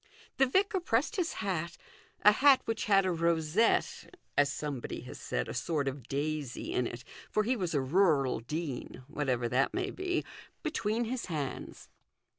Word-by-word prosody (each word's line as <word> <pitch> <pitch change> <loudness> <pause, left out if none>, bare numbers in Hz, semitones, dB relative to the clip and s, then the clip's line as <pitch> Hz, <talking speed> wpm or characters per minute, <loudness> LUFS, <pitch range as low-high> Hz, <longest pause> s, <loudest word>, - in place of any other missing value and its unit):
The 270 - +5
vicar 385 +7 +2
pressed 305 - 0
his 350 -3 0
hat 170 -3 -2 0.5
a 210 - +9
hat 270 +4 +6
which 225 -1 -2
had 195 -2 +4
a 185 - +2
rosette, 170 - +1 0.2
as 145 0 +4
somebody 145 -4 -4
has - - -9
said, - - -2
a - - -5
sort 150 -4 -1
of 135 -3 -4
daisy 145 -2 -3
in 125 - +1
it, 120 +1 -7 0.3
for 215 - +2
he 250 +5 +1
was 180 -8 -2
a 140 - +3
rural 140 - +3
dean, 135 0 -5
whatever 130 -5 -1
that 130 +3 +1
may 380 +1 -1
be 360 -2 -2 0.4
between 235 -8 0
his 245 +1 -3
hands. 145 -6 -5
170 Hz, 165 wpm, -31 LUFS, 140-230 Hz, 0.5 s, a